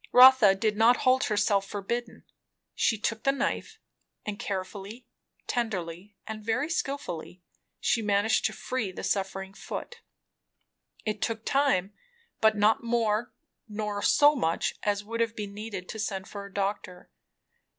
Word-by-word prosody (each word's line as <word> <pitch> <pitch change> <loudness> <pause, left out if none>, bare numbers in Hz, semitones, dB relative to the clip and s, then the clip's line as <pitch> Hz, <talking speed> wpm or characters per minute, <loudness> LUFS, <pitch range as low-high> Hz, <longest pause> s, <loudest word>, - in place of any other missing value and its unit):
Rotha 250 -6 +8
did 210 +1 0
not 230 +3 +6
hold 260 0 +4
herself 205 -2 +1
forbidden. 225 +4 -4 0.5
She 220 - +2
took 220 +1 -2
the 275 - +3
knife, 275 - -2 0.5
and 210 -1 -4
carefully, 200 +4 -5 0.4
tenderly, 200 -4 -3
and 220 -1 -6
very 230 +9 0
skilfully, 275 - -4 0.4
she 230 - +1
managed 205 +1 +2
to - - +2
free 250 -7 -3
the - - -8
suffering 195 -1 -2
foot. 475 - -7 1.0
It 215 -1 -2
took 225 -1 -2
time, 255 -9 +2 0.5
but 220 -1 +4
not 215 +5 +3
more, 230 -1 0 0.4
nor 210 -1 -3
so 290 +7 +5
much, 165 - 0
as 205 0 0
would 230 +2 -5
have 230 0 0
been 205 -1 -5
needed 205 -3 -6
to 220 - -6
send 195 -3 -3
for 200 -1 -7
a - - -16
doctor. 195 -2 -3
210 Hz, 140 wpm, -28 LUFS, 200-230 Hz, 1.0 s, Rotha